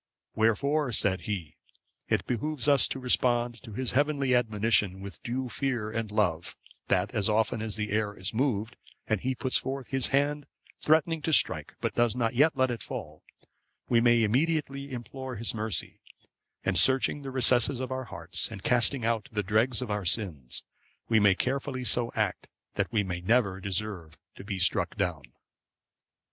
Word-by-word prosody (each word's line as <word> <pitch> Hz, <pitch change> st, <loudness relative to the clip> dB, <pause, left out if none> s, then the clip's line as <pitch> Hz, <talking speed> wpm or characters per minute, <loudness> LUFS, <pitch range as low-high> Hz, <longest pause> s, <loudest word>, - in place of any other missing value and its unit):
Wherefore," 140 Hz, +6 st, +1 dB
said 95 Hz, -3 st, +3 dB
he, 85 Hz, -8 st, -4 dB, 0.5 s
"it -, -, +1 dB
behoves 125 Hz, +2 st, -2 dB
us 140 Hz, -2 st, +5 dB
to -, -, -4 dB
respond 120 Hz, -2 st, +1 dB
to 115 Hz, -5 st, -11 dB
His 130 Hz, +3 st, -2 dB
heavenly 140 Hz, -2 st, +1 dB
admonition 105 Hz, -5 st, +1 dB
with 100 Hz, 0 st, -9 dB
due 130 Hz, +1 st, -3 dB
fear 120 Hz, -4 st, -2 dB
and 115 Hz, -1 st, -3 dB
love; 90 Hz, -6 st, -1 dB, 0.3 s
that, -, -, +1 dB
as 105 Hz, 0 st, +1 dB
often 110 Hz, 0 st, +1 dB
as 110 Hz, -1 st, -3 dB
the 105 Hz, -1 st, -3 dB
air 105 Hz, -1 st, -1 dB
is 95 Hz, +4 st, -3 dB
moved 115 Hz, -2 st, -1 dB, 0.3 s
and 110 Hz, -3 st, -1 dB
He 130 Hz, +1 st, -1 dB
puts 130 Hz, 0 st, +1 dB
forth 135 Hz, -1 st, -5 dB
His 135 Hz, -2 st, 0 dB
hand 145 Hz, +1 st, 0 dB, 0.3 s
threatening 160 Hz, +1 st, +2 dB
to 160 Hz, -, -1 dB
strike, -, -, +2 dB
but -, -, -1 dB
does 120 Hz, -1 st, +1 dB
not 115 Hz, -2 st, 0 dB
yet 145 Hz, +4 st, +3 dB
let 130 Hz, -1 st, +2 dB
it 120 Hz, -, -5 dB
fall, -, -, -7 dB, 0.7 s
we 115 Hz, -1 st, +4 dB
may 120 Hz, -1 st, +4 dB
immediately 140 Hz, +3 st, 0 dB
implore 130 Hz, +1 st, -7 dB
His 115 Hz, +1 st, 0 dB
mercy; 110 Hz, -6 st, -3 dB, 0.6 s
and -, -, +3 dB
searching 135 Hz, +2 st, +4 dB
the 135 Hz, -, -6 dB
recesses 125 Hz, 0 st, +4 dB
of 130 Hz, 0 st, -4 dB
our 130 Hz, 0 st, -3 dB
hearts, 110 Hz, -, -2 dB
and 95 Hz, -, -9 dB
casting 125 Hz, 0 st, +2 dB
out 115 Hz, +3 st, -1 dB
the 105 Hz, -2 st, -1 dB
dregs 110 Hz, +4 st, +1 dB
of 115 Hz, -, -5 dB
our 105 Hz, -1 st, -2 dB
sins, 85 Hz, -, 0 dB, 0.5 s
we 115 Hz, -1 st, +4 dB
may 100 Hz, -2 st, +5 dB
carefully 130 Hz, +2 st, -2 dB
so 120 Hz, +2 st, +1 dB
act 105 Hz, -4 st, -1 dB, 0.3 s
that -, -, -2 dB
we 105 Hz, -3 st, +1 dB
may 90 Hz, -2 st, -4 dB
never 100 Hz, -1 st, +1 dB
deserve 95 Hz, -4 st, -3 dB, 0.2 s
to -, -, -11 dB
be 100 Hz, -1 st, -4 dB
struck 95 Hz, +1 st, +2 dB
down." 90 Hz, -7 st, -1 dB
115 Hz, 175 wpm, -28 LUFS, 105-130 Hz, 0.7 s, us